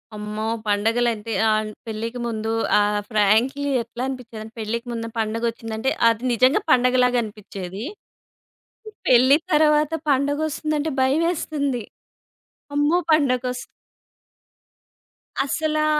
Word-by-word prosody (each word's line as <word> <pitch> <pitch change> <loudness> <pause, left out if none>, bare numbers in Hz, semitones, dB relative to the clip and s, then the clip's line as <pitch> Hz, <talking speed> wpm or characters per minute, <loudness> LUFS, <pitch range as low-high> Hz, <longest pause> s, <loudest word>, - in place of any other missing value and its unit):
అమ్మో! 210 +1 -4 0.2
పండగలంటే 225 +1 0 0.2
ఆహ్, 215 0 +1 0.2
పెళ్ళికి 230 +2 -4
ముందు 220 -1 -3 0.3
ఆ - - +5 0.3
ఫ్రాంక్‌లీ 230 +7 +2
ఎట్లా 235 +1 -8
అనిపించేదంటే 230 -4 -7
పెళ్ళికి 230 +3 -3
ముందు 230 -1 -4
పండగొచ్చిందంటే 225 +1 -2 0.2
అది 230 +1 +1
నిజంగా 255 - +4
పండగలాగనిపిచ్చేది. 235 -6 0 1.2
పెళ్లి 260 +3 +6 0.2
తర్వాత 300 0 +4 0.2
పండగ 285 +1 +2
వస్తుందంటే 305 0 -2
భయమేస్తుంది. 285 -2 0 0.9
అమ్మో! 290 +4 +3
పండగొస్ 255 -4 +1 1.8
అసలా 310 0 0
245 Hz, 85 wpm, -22 LUFS, 220-285 Hz, 1.8 s, పెళ్లి